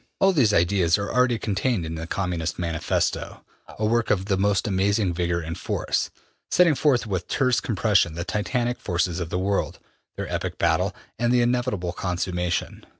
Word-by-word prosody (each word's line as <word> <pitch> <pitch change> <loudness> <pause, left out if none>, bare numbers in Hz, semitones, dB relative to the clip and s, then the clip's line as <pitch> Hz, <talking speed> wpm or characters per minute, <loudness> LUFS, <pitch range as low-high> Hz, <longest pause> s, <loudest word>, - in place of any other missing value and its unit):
All 195 0 +5
these 130 -10 +4
ideas 85 -2 +3
are 100 0 -3
already 125 -1 +3
contained 105 -2 -1
in 80 - -5
the 80 0 -5
``Communist 90 -3 -2
Manifesto,'' 85 -3 -1 0.4
a 110 - -1
work 115 +1 +1
of 95 -2 +1
the 100 -1 +1
most 100 +1 +1
amazing 100 -1 +1
vigor 85 0 -1
and 80 0 -5
force, - - -1 0.4
setting 175 -3 +5
forth 135 -3 +2
with 95 -5 -3
terse 130 -2 +2
compression 100 -6 +1
the 85 - -3
titanic 120 +5 -1
forces 90 -1 -1
of 85 -2 -4
the 90 - -2
world, 100 +2 -1 0.4
their - - -4
epic - - -3
battle, - - +1 0.2
and 120 0 +2
the 125 -1 +4
inevitable 120 -8 0
consummation. 90 -1 -2
100 Hz, 170 wpm, -24 LUFS, 90-120 Hz, 0.4 s, All